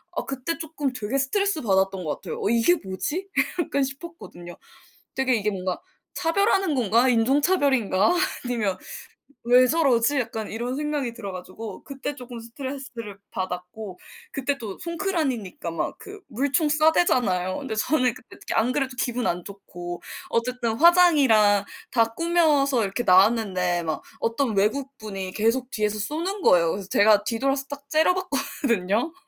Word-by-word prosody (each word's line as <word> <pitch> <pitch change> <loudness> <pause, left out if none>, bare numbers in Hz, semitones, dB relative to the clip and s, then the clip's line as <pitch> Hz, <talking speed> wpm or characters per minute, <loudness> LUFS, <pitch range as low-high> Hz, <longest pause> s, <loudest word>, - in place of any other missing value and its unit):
아 - - -1
그때 270 +5 -3
쪼끔 300 -4 -3
되게 245 +2 -2
스트레스 335 +5 +1
받았던 190 -3 +1
거 150 - -1
같아요. - - -7
'어 - - 0
이게 235 +9 +4
뭐지?' 295 - -3 0.3
약간 280 -3 0
싶었거든요. 270 - -8 0.6
되게 265 -1 +2
이게 210 -1 0
뭔가 185 -2 -3 0.3
'차별하는 385 0 +2
건가? 235 +1 +3
인종차별인가?' 265 - +3 0.3
아니면 215 -7 -1 0.7
'왜 250 +2 +6
저러지?' 275 -3 +3
약간 220 -3 -4
이런 240 +3 -3
생각이 290 -4 -2
들어 205 -5 -6
가지고 185 +3 -8
그때 275 +1 -5
쪼금 245 -3 -9
스트레스를 235 -3 -7
받았고 185 +2 -6 0.3
그때 280 +1 -2
또 215 -6 -7
송크란이니까 320 - -2
막 165 -1 -3
그 415 -1 -10
물총 280 +5 +1
쏴 310 +2 +4
대잖아요. 185 - +1
근데 270 -6 -5
저는 250 +2 +2
그때 - - -15 0.2
안 225 +3 +2
그래도 265 -3 -1
기분 245 -2 -1
안 175 0 -1
좋고 175 -3 -8 0.3
어쨌든 235 -1 -1
화장이랑 275 - +5 0.3
다 230 -2 +2
꾸며서 300 -7 +2
이렇게 200 +4 -2
나왔는데 185 -3 +3
막 160 -2 -3 0.2
어떤 230 -1 0
외국분이 215 -4 -2
계속 235 +4 +1
뒤에서 210 -1 -1
쏘는 335 - -3
거예요. 170 -2 +5
그래서 195 +1 -6
제가 210 0 +5
뒤돌아서 270 +5 -1
딱 285 0 -8
째려봤거든요. 280 - 0
245 Hz, 335 characters per minute, -24 LUFS, 205-285 Hz, 0.7 s, 왜